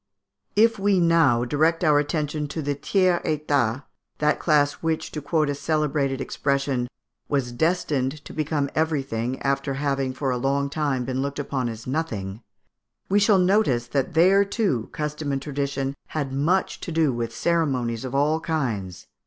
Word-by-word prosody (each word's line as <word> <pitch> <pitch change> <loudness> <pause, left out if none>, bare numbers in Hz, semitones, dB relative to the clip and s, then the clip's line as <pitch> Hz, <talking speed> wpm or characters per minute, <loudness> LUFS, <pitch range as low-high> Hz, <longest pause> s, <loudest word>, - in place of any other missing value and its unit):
If 225 +1 +4
we 195 -1 +3
now 165 -8 +4
direct 160 +6 +1
our 150 -3 +5
attention 150 0 -2
to 150 +2 -4
the 145 +1 0
tiers 180 +5 +1
état, 145 -5 0 0.3
that 150 0 +1
class 145 -3 +3
which, 160 -1 -1
to 150 - -5
quote 155 +1 +1
a 145 - 0
celebrated 145 -2 0
expression, 140 -1 -1 0.4
"was 135 -4 0
destined 150 -1 0
to - - -9
become 150 -2 -1
everything, 135 -6 -1
after 135 0 0
having 135 -2 -1
for 135 -1 -1
a 125 - 0
long 140 +2 0
time 140 -5 -1
been 130 +1 -2
looked 140 +1 -3
upon 135 -4 -2
as 115 0 -8
nothing," 115 -8 -3 0.7
we 200 +2 +4
shall 205 -1 +5
notice 180 - +3
that 140 +3 -1
there, 190 +4 +6
too, 195 - -1
custom 150 -1 -3
and 135 - 0
tradition 140 -1 -2
had 140 -4 -3
much 165 +8 +1
to - - -6
do 160 -4 +2
with 115 -1 -3
ceremonies 125 -4 0
of 130 0 -5
all 150 +3 +2
kinds. 115 - -3
145 Hz, 160 wpm, -24 LUFS, 135-160 Hz, 0.7 s, there